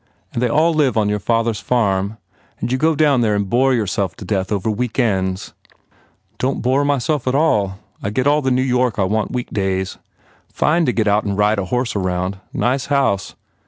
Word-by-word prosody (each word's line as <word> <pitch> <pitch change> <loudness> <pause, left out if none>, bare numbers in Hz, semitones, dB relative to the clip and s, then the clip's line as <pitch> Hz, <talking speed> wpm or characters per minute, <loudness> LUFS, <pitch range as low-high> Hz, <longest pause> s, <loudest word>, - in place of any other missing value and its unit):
And 115 - -2
they 125 - +2
all 160 +6 +3
live 140 -7 +2
on 105 -1 +2
your 105 0 0
father 115 +3 +1
s 105 - -6
farm? 100 -3 0 0.4
And - - -3
you 130 - +1
go 160 +2 +2
down 145 -4 +3
there 110 -3 +2
and 100 -1 -1
bore 130 +6 +3
yourself 100 -6 -1
to 100 - -10
death 95 0 -1
over 100 0 -1
weekends?" 100 -5 -1 0.9
"Don 130 +2 0
t - - -5
bore 130 +3 +2
myself 145 0 0
at 130 - +1
all. 105 -11 +2 0.2
I 100 - -2
get 130 +5 -1
all 145 +1 +3
the 135 - 0
New 130 0 +2
York 125 -3 +1
I 100 - +2
want 105 +3 0
weekdays. 95 -6 -2 0.5
Fine 165 +2 +2
to - - +3
get 110 -3 0
out 105 +1 +3
and 100 -1 -2
ride 105 0 +2
a 95 - -2
horse 125 +5 -1
round. 95 0 -2
Nice 130 +2 0
house. 135 -9 0
115 Hz, 205 wpm, -19 LUFS, 100-130 Hz, 0.9 s, all